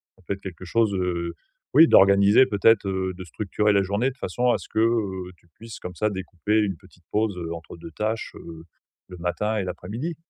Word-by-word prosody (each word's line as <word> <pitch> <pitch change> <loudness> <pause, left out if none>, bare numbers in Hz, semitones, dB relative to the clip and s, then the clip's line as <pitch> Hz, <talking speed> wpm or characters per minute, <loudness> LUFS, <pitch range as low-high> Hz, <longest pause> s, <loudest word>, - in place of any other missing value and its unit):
Ça 95 - -25
peut - - -2
être 100 - -9
quelque 95 -2 -8
chose 110 +3 +1
heu, 85 -2 -2 0.4
oui 160 +5 +8
d'organiser 100 +4 +6
peut-être, 105 0 +3
heu, 95 -1 -2
de 95 - -8
structurer 105 +3 0
la 100 -1 +3
journée 100 +7 0
de 130 - -18
façon 125 +2 0
à - - +2
ce - - -12
que, - - -2
heu, 100 -6 0
tu 85 - -29
puisses 115 -1 -10
comme 90 -1 -8
ça 105 +5 0
découper 95 +1 -1
une 100 -5 0
petite 90 -1 -22
pause, 105 -2 0
heu, 85 -1 -4
entre 85 -1 -9
2 85 0 -10
tâches, 110 +6 -3
heu, 80 -1 -10 0.4
le 90 - -10
matin 100 +5 -2
et 100 - -1
l'après-midi. 105 - -5
100 Hz, 215 wpm, -24 LUFS, 90-110 Hz, 0.4 s, oui